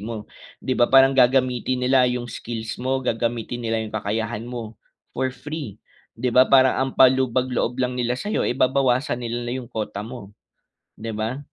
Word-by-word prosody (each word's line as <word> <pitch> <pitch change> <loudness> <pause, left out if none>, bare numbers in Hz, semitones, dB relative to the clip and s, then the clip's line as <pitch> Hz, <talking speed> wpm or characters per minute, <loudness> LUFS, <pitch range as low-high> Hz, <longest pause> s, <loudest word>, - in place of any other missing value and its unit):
mo. 110 0 -6 0.4
'Di 130 - -2
ba, 120 - +4
parang 135 0 +6
gagamitin 125 0 +2
nila 130 -1 +4
yung 125 0 -2
skills 115 0 -6
mo, 130 +1 0
gagamitin 115 0 -2
nila 115 -1 -1
yung 110 - -9
kakayahan 110 +1 -3
mo, 115 -3 -7 0.4
for 130 +1 -1
free, 140 -4 -7 0.4
'di 125 +2 -1
ba, 130 +1 +5
parang 130 -1 +5
ang 135 0 0
pampalubag-loob 130 -1 +3
lang 125 -1 0
nila 125 0 0
sa'yo 210 - -2
eh, 125 - -2
babawasan 130 -1 +1
nila 120 0 -3
na, 120 - -3
yung 125 -2 -7
quota 105 -4 -4
mo, 105 -2 -9 0.7
'di 110 -1 -5
ba? 110 +5 -3
125 Hz, 170 wpm, -23 LUFS, 115-130 Hz, 0.7 s, parang